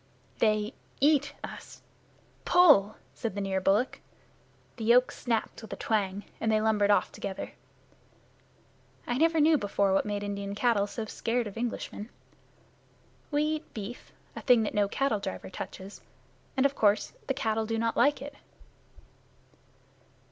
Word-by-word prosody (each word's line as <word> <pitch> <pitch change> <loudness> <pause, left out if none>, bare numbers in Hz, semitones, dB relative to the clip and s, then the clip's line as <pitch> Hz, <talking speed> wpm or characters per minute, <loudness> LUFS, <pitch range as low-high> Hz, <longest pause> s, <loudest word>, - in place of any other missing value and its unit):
"They 215 0 +2 0.3
eat 290 0 +3
us! - - -9 0.6
Pull!" 295 - +6 0.2
said 225 -4 -4
the - - -2
near 190 -1 -1
bullock. 205 +7 +1 0.8
The 225 - -5
yoke 245 +2 +5
snapped 230 -2 -2
with 220 - -11
a - - -3
twang, 205 -2 -1 0.2
and 225 - +1
they 215 - +3
lumbered 215 -2 +2
off 205 - +3
together. 195 -1 -6 1.5
I 245 +2 -1
never 325 0 +3
knew 310 0 +5
before 200 -2 +1
what 195 - +2
made 205 -1 -2
Indian 200 0 -4
cattle 210 -2 +2
so 220 +2 -5
scared 235 +3 -1
of 205 - -7
Englishmen. 230 -2 -4 1.2
We 295 0 +1
eat 310 0 -3
beef 220 +3 -7 0.2
a - - -6
thing 245 -3 +5
that 210 - -3
no 205 -1 +2
cattle 230 0 0
driver 190 -1 -6
touches 190 +2 -8 0.6
and 265 - +3
of 280 - +3
course 210 -5 +2
the 270 - 0
cattle 220 -2 -1
do 225 0 -1
not 230 0 0
like 285 -1 +3
it. 285 0 -8
220 Hz, 150 wpm, -29 LUFS, 205-250 Hz, 1.5 s, Pull